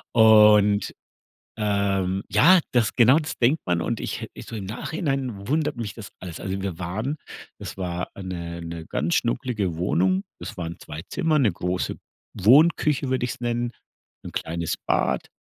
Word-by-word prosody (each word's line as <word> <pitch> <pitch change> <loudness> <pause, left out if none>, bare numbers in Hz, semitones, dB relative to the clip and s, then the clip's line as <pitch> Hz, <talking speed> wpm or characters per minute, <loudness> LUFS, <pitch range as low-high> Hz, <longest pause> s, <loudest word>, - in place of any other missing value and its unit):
Und, 105 -2 +6 0.6
ähm, 100 -2 0
ja, 185 +1 +6
das 120 -4 +1
genau 125 +5 +6
das 155 - -5
denkt 130 +7 +2
man 90 -2 +1
und - - -2
ich - - -4
he - - -5
ich - - -10
so - - -7
im 100 -3 -5
Nachhinein 130 - -3
wundert 150 0 0
mich 115 -3 -4
das 105 -4 -9
alles. 90 -3 -8
Also, 95 0 -3
wir 95 -4 -4
waren 110 - -3 0.4
das - - -7
war 90 -2 -3
'ne 85 -3 -5
'ne 85 -1 -7
ganz 85 +3 0
schnuckelige 115 - -1
Wohnung. 95 +2 +1 0.2
Das 105 - -8
waren 85 0 -5
2 75 +2 -8
Zimmer, 155 -2 +1
'ne 120 -9 +3
große 90 +2 -2 0.4
Wohnküche 140 - +4
würde 130 -1 0
ich's 125 - -5
nennen, 120 0 -1 0.6
'n - - -6
kleines 85 0 -3
Bad - - +1
105 Hz, 165 wpm, -24 LUFS, 90-125 Hz, 0.6 s, Und